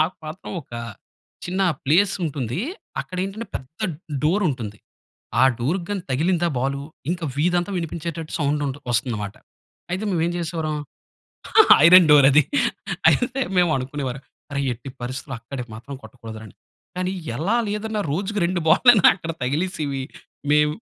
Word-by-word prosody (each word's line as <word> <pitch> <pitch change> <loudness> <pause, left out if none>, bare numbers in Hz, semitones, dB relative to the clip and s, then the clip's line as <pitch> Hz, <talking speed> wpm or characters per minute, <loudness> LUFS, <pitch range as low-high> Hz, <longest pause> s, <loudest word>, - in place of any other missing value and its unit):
మాకు 170 +4 -2
మాత్రం, 160 +4 -8
ఒక 120 - -25 0.7
చిన్న 185 +2 -1 0.2
ప్లేస్ 180 +8 +4
ఉంటుంది. 140 - -2 0.4
అక్కడ 185 - -8
ఏంటంటే, 215 +4 -6
పెద్ద 135 +5 -14 0.5
డోర్ 190 +7 +2
ఉంటుంది. 110 -6 -6 0.6
ఆ - - +8 0.2
డోర్‌కి 170 +8 -1
గాని, 200 -3 -2
తగిలిందా 170 +5 +1
బాలు, 140 +2 -1 0.3
ఇంకా 175 -2 -3
వీధంతా 175 +4 +1
వినిపించేటట్టు, 165 -1 -5
సౌండుంటు 145 -1 -1
వస్తుంది 120 -1 0
మాట. 100 - -6 0.6
అయితే 190 +3 -2
మేము 170 -4 0
ఏం 175 - 0
చేసేవారం, 160 -2 -2 1.1
ఐరన్ 180 -1 +9
డోర్ 145 -2 +8
అది. 150 +1 +6 0.7
అయితే 255 +2 +1 0.2
మేము 175 -2 +4
అనుకునేవారం, 135 0 -4 0.3
"అరేయ్, 140 -1 -1
ఎట్టి 120 +4 -10
పరిస్థితిలో 130 +1 -5
అక్కడికి 125 0 -7
మాత్రం, 130 +5 -9
కొట్టకూడదు 115 -3 -10
రా" - - -10
అని. - - -17 0.4
కానీ 185 +1 -1 0.2
ఎలా 195 +10 +1
లేదన్న, 210 +1 -2
రోజుకి 200 +4 -1
రెండు 180 -1 -1
బాల్ 205 - +4
లన్న, 215 -7 +7
అక్కడ 165 -1 -4
తగిలేసేవి. 145 -1 -1 0.5
మేమ్ 150 0 +4
155 Hz, 145 wpm, -23 LUFS, 135-180 Hz, 1.1 s, ఐరన్